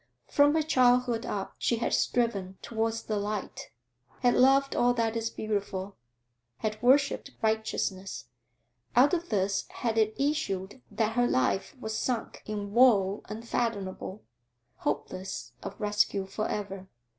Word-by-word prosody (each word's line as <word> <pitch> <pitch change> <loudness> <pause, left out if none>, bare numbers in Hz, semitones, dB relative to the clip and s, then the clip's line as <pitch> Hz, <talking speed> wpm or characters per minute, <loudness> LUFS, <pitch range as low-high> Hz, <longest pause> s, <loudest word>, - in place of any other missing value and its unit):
From 290 +1 +4
her 315 - +3
childhood 250 -4 +3
up 195 -2 -3
she 235 - +2
had 235 - -1
striven 200 -6 0
towards 225 0 -1
the 215 - -2
light, 205 0 -4 0.5
had 245 -1 +4
loved 275 +2 +4
all 245 0 +3
that 230 -1 0
is 225 0 -1
beautiful, 200 -3 -3 0.6
had 215 +4 -3
worshipped 275 +3 +3
righteousness; 220 -3 -1 0.7
out 265 +6 +6
of 345 0 -1
this 195 -1 0
had 225 -2 -1
it 215 0 +2
issued 265 -7 -1
that 220 -1 0
her 245 0 +3
life 190 - 0
was 220 -2 -4
sunk 240 +1 -2
in 205 -1 -4
woe 210 -5 +5
unfathomable, 215 -3 -3 0.5
hopeless 185 +1 -4
of - - -7
rescue 210 -2 +1
for 205 +3 -3
ever. 195 -2 -4
220 Hz, 135 wpm, -29 LUFS, 200-245 Hz, 0.7 s, out